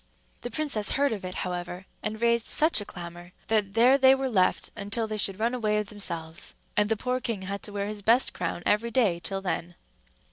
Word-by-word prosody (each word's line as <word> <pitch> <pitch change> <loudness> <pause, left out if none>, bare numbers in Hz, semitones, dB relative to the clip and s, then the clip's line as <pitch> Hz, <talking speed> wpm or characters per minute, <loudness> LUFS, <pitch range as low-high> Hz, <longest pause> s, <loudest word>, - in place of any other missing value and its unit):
The 245 - -4
princess 245 -6 0
heard 280 -3 +2
of 205 - -6
it, 185 0 -5
however, 180 +1 -5 0.2
and 215 0 -3
raised 235 0 +2
such 310 -7 +4
a - - -6
clamor, 175 0 -9 0.2
that 210 -2 +1
there 250 +4 +6
they 265 0 +7
were 265 0 -2
left 185 -6 +2
until 205 +3 -1
they 215 0 -4
should 195 -1 0
run 230 +3 +1
away 215 -4 +1
of 210 -1 -2
themselves; 170 -4 -5 0.2
and 210 0 +3
the 225 - +1
poor 250 +3 -1
king 230 -6 -3
had 200 +1 -4
to 210 - -8
wear 200 0 -2
his 210 0 -5
best 230 +5 +3
crown 175 - -3
every 220 +3 +2
day 215 -8 +2
till 195 +2 -4
then. 175 -2 -3
210 Hz, 215 wpm, -27 LUFS, 190-235 Hz, 0.2 s, they